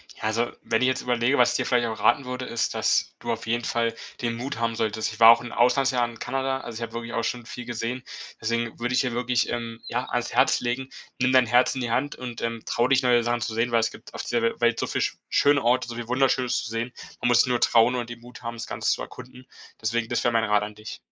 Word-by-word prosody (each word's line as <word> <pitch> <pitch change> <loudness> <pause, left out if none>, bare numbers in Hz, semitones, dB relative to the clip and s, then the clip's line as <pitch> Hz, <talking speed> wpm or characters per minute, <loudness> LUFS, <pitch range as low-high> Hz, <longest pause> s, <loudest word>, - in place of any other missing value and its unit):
Ja, - - -14
also 115 +2 0
wenn 115 +1 0
ich 130 - +4
jetzt 130 - 0
überlege, 125 +2 +1
was 125 - +5
ich - - -3
dir - - -1
vielleicht 120 -2 +2
auch 110 - -5
raten 120 +4 +3
würde, 125 0 -4
ist, 115 -2 -1
dass - - +1
du 120 - -3
auf 115 0 -4
jeden 120 +1 -1
Fall 115 0 0 0.3
den 115 -1 -1
Mut 125 +1 -5
haben 115 -1 0
solltest. 110 -1 -1
Ich 110 - -12
war 115 0 +9
auch 115 - +7
'n 120 - -7
Auslandsjahr 125 0 +2
in 115 - -12
Kanada, 135 +1 -1
also 115 - -7
ich - - -7
habe 115 -1 -5
wirklich 115 0 -5
auch 115 - -1
schon 120 -2 -3
viel 120 +1 -8
gesehen. 120 +2 -4 0.4
Deswegen 115 +1 -2
würde 120 +1 -1
ich - - +4
dir 125 -3 -2
wirklich, 125 0 0
ähm, 115 -1 -4
ja, - - -2
ans - - -2
Herz - - +4
legen, 125 +2 -2 0.3
nimm 130 0 +3
dein 130 -1 +5
Herz 125 +3 +3
in 130 - -3
die 120 -2 -2
Hand 145 +5 0
und, 120 -2 -7
ähm, 115 -1 -3
trau 120 +1 +1
dich 135 0 +3
neue 120 -2 +4
Sachen 120 0 0
zu 110 +2 -2
sehen, 115 +2 0
weil 115 - +4
es 110 - 0
gibt - - -14
auf - - -5
dieser 120 -1 0
We 115 - +1
Welt 120 -1 +2
so - - -1
viel - - -1
sch - - -1
schöne 145 -1 +4
Orte, 120 +1 +2
so 120 - -6
viel 120 -1 -6
Wunderschönes 125 0 +1
zu 110 - -6
sehen. 115 +2 -3 0.3
Man - - +1
muss 120 -1 +5
nur 125 -1 0
trauen 115 +2 +5
und 120 -1 -3
den 120 0 -8
Mut 120 +1 -13
haben, 115 0 -5
das 115 - -6
Ganze - - -1
zu - - -1
erkunden. 125 +1 -10 0.3
Deswegen, 115 +1 -1
das 120 - 0
wäre 120 - +3
mein 115 -1 +2
Rat 105 -1 +2
an 105 0 -6
dich. 110 +1 -8
120 Hz, 280 wpm, -25 LUFS, 115-125 Hz, 0.4 s, war